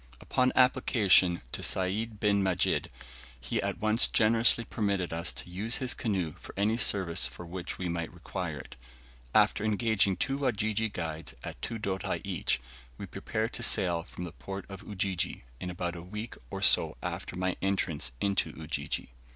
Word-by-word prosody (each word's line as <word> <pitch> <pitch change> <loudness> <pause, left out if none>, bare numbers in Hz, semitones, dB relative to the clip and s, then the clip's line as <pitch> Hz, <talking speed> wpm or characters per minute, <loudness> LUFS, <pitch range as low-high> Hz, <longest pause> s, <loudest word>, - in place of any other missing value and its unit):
Upon 130 0 +2
application 110 - +5
to - - -3
Sayd 105 +4 +1
bin 100 -1 +3
Majid, 95 -2 +1 0.5
he - - -1
at - - -2
once 110 +2 +3
generously 115 +1 +4
permitted 100 -7 -1
us 85 +1 -1
to - - -7
use 105 +6 0
his 130 -2 0
canoe 95 -9 -1
for - - -11
any 105 +3 +2
service 95 - +3
for 65 +8 -10
which 90 +1 -4
we 90 - -2
might 85 -1 -2
require 85 -2 -5
it. 65 - -10 0.6
After - - +4
engaging 105 -3 +2
two 135 +8 -1
Wajiji 110 -4 0
guides 80 -4 -4
at - - -7
two 115 - -3
doti 95 -3 -2
each, - - 0 0.4
we - - -6
prepared 110 +2 -3
to - - 0
sail 90 -7 +4
from 85 - -8
the 85 - -5
port 95 +11 -7
of 95 -1 -8
Ujiji, 95 -7 -2 0.2
in 90 - -4
about 90 0 -3
a 85 - -6
week 105 +6 -6 0.2
or - - -4
so - - +4
after - - -4
my 90 0 0
entrance 95 -8 0
into 100 -1 +1
Ujiji. 75 -5 -3
95 Hz, 165 wpm, -30 LUFS, 85-110 Hz, 0.6 s, application